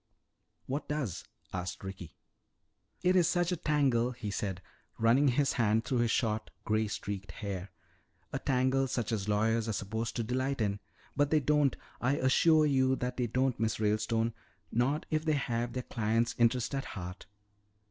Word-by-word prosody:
"What 140 +3 -3
does?" 145 - -3 0.3
asked 90 +1 -4
Ricky. 95 -4 -8 0.9
"It 180 +1 +4
is 175 -3 +5
such 175 0 +1
a - - +1
tangle," 135 -6 +2
he 110 -4 -5
said, 95 -2 -2 0.4
running 120 +6 +4
his 135 +1 +2
hand 115 -1 +2
through 125 -1 0
his 120 -1 +2
short, 110 -1 0 0.2
gray 110 0 +1
streaked 100 -1 -5
hair. 100 -3 -5 0.6
"A - - -1
tangle 130 +1 +2
such 120 -4 -2
as 105 -2 -1
lawyers 110 +2 +2
are - - 0
supposed 110 +3 -3
to 115 - 0
delight 130 +4 -1
in. 100 -2 0 0.4
But 145 0 +2
they 155 - +4
don't, 150 -1 +2 0.3
I 130 +3 +2
assure 155 +4 +4
you 130 -2 +3
that 125 -1 -3
they 125 -2 0
don't, 130 +1 0
Miss 110 -1 0
Ralestone. 110 +2 +1 0.4
Not 130 +6 +1
if 155 0 +1
they 155 -1 +2
have 120 -4 -1
their 125 - -3
client's 115 +1 0
interest 120 +2 +2
at 135 0 -2
heart. 90 0 -7
120 Hz, 170 wpm, -31 LUFS, 110-135 Hz, 0.9 s, is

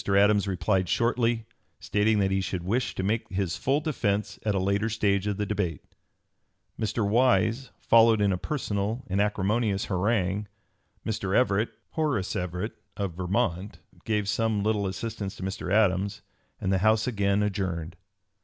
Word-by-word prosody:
Adams 100 0 +4
replied 95 -1 0
shortly, 115 -1 +1 0.3
stating 105 +1 +1
that 95 -1 +2
he 95 0 +1
should 90 -2 -3
wish 115 +8 -1
to - - -2
make 110 +4 -1
his 95 -2 -1
full 135 +3 +1
defence 105 - -1
at 105 -2 0
a - - +2
later 100 +4 +1
stage 100 -2 +1
of 100 -2 -1
the 105 - -1
debate. 95 -8 -2 1.0
Mr. 110 -1 0
Wise 120 +2 +2
followed 115 -1 +5
in 100 -1 +3
a 95 - 0
personal 110 -3 -2
and 100 +2 0
acrimonious 105 0 0
harangue; 100 0 0 0.6
Mr. 105 -3 -1
Everett 110 -3 +2 2.3
gave 105 -2 0
some 110 0 0
little 105 -2 +1
assistance 100 0 -4
to - - -8
Mr. 95 -1 -4
Adams, 100 0 +2 0.4
and 95 - 0
the 95 - +2
House 110 +2 +3
again 100 -3 +1
adjourned. 95 -5 -2
105 Hz, 140 wpm, -27 LUFS, 95-110 Hz, 2.3 s, followed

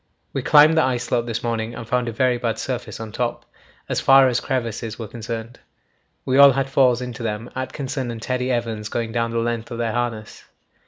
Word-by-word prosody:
We 135 - -1
climbed 150 +4 +6
the 160 - +5
ice 125 -2 0
slope 120 -1 -1
this 115 -1 -3
morning 115 0 -2
and 115 - -8
found 125 0 0
a - - -2
very 125 +2 +1
bad 115 -2 -1
surface 125 -1 -4
on 110 -1 -7
top, - - -3 0.4
as - - -1
far 135 0 +7
as 125 -1 +1
crevasses 115 -3 -3
were 115 - -6
concerned. 115 +1 -6 0.7
We 130 +1 +2
all 140 -1 +9
had 135 +1 -1
falls 125 -3 +3
into 125 -2 -7
them, 115 +1 -4
Atkinson 130 0 -4
and 115 -1 -5
Teddy 125 +2 -2
Evans 115 -3 -2
going 115 0 -3
down 115 0 0
the 115 - -3
length 115 0 -2
of 120 - -6
their 115 -2 -1
harness. 120 -3 -4
120 Hz, 210 wpm, -22 LUFS, 115-130 Hz, 0.7 s, all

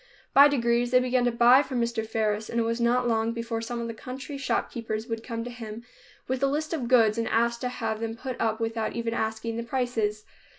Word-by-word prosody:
By 280 +1 +9
degrees 240 -3 +1
they 250 +1 +5
began 250 0 +1
to 245 - +2
buy 240 +3 +6
from 260 -4 -3
Mr. 235 -1 -1
Faris, 215 -1 -1
and 235 - -1
it - - +2
was 230 +1 -1
not 245 +1 +2
long 225 0 +1
before 230 -1 -3
some 235 +1 -4
of 235 - -3
the 230 - -4
country 260 +5 -7
shopkeepers 230 -5 -2
would 225 -2 -4
come 230 -1 -4
to 245 - -6
him 230 -2 -8 0.4
with 260 +1 -2
a 275 - +4
list 305 +4 -2
of 265 -7 -2
goods 230 -3 +4
and 230 - -1
ask 235 +1 +1
to 250 - -2
have 220 -3 -3
them 225 0 -3
put 255 +1 -6
up 220 0 0
without 225 -1 -2
even 230 -1 -2
asking 220 0 -2
the 235 - -2
prices. 230 -4 -1
235 Hz, 230 wpm, -27 LUFS, 225-250 Hz, 0.4 s, By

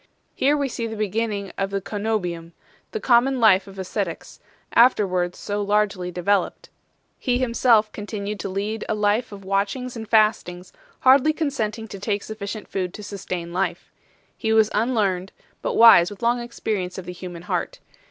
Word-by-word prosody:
Here 290 +2 +2
we 280 -1 0
see 230 -2 -4
the 220 - -6
beginning 210 -1 -2
of 195 0 0
the 195 0 -2
ccenobium, 195 -5 -3 0.4
the 440 - -4
common 255 - +3
life 200 -4 +5
of 195 0 -12
ascetics, 190 -2 -4 0.3
afterwards 185 -7 +3
so 205 0 -3
largely 205 -3 0
developed. 180 +2 -1 0.5
He 245 -1 +1
himself 235 -3 +3
continued 205 -1 -5
to 195 - -4
lead 205 +3 -3
a - - +1
life 210 +3 +1
of 195 -1 -10
watchings 200 +6 -1
and 220 -2 -7
fastings, 205 -5 +1 0.3
hardly 270 +4 +5
consenting 230 -8 -2
to 200 - -8
take 205 0 -2
sufficient 215 -1 -6
food 185 -2 -3
to 210 - -8
sustain 180 -4 -5
life. 190 +2 -2 0.4
He 220 - -2
was 220 -1 +4
unlearned, 205 -5 0 0.3
but - - -2
wise 220 -7 +8
with 205 +2 -11
long 240 +1 +2
experience 215 -6 -4
of 190 - -6
the 180 - -6
human 175 -1 -8
heart. - - -3
210 Hz, 160 wpm, -23 LUFS, 190-230 Hz, 0.5 s, wise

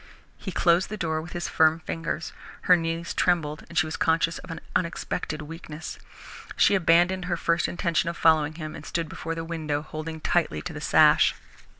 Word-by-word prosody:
He 190 - -7
closed 170 +1 +3
the 215 - -5
door 160 -4 -1
with 175 +2 -7
firm 160 0 +3
fingers. 165 0 -4 0.3
Her 180 - +6
knees 165 0 -2
trembled, 160 -4 0
she 175 - +3
was 155 - -5
conscious 165 0 +1
of - - -12
an 165 -1 -5 0.2
unexpected 160 -3 -2
weakness. 160 0 -8 0.6
She - - +4
abandoned 180 0 +3
her 175 -1 -1
first 170 +1 +1
intention 170 -3 0
of 170 - -5
following 155 -2 +3
him, 155 -2 -6
and - - -9
stood 165 -1 -3
before 165 +2 -5
the 165 0 -4
window, 155 -3 -3
holding 155 +1 -6
tightly 155 - 0
to - - -6
the - - -7
sash. - - +5
165 Hz, 180 wpm, -26 LUFS, 155-170 Hz, 0.6 s, Her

